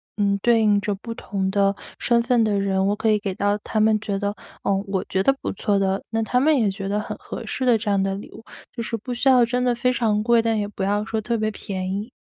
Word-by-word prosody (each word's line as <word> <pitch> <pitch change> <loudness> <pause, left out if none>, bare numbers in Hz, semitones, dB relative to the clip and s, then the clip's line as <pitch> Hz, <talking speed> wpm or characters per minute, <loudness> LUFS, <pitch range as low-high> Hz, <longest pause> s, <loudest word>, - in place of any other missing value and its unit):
呃， 200 -1 +1
对 235 0 +4
应 210 -2 +4
着 205 0 -2
不 230 +4 -7
同 190 -2 -3
的 200 0 +2 0.2
身 235 -1 +3
份 235 -2 +3
的 210 -2 +1
人， 195 -1 +1
我 205 - +1
可 220 +1 0
以 210 - +3
给 195 -2 -4
到 205 +1 +1
他 215 +1 -5
们 215 0 +3
觉 205 -2 -3
得， 200 0 -2 0.3
呃， 200 - +2
我 195 -1 -1
觉 190 - +1
得 270 - +4
不 - - -2
错 200 0 0
的， 195 0 0
那 225 0 0
他 250 +3 +1
们 300 +3 +4
也 215 -6 +2
觉 195 0 -6
得 205 - 0
很 - - -6
合 - - -8
适 260 - -3
的 240 -3 +5
这 210 -1 -2
样 200 -1 +2
的 195 0 0
礼 200 - -9
物， - - -12 0.3
就 235 - -6
是 230 - -2
不 235 +3 -5
需 245 +3 -1
要 255 -2 +6
真 245 +2 0
的 245 - +2
非 250 +1 +1
常 220 -4 +1
贵， 235 0 +4
但 225 -1 0
也 205 - 0
不 205 -1 -5
要 205 +2 +1
说 220 0 -2
特 230 +2 -1
别 215 0 -1
便 190 -2 -5
宜。 210 +5 -4
210 Hz, 300 characters per minute, -23 LUFS, 200-230 Hz, 0.3 s, 要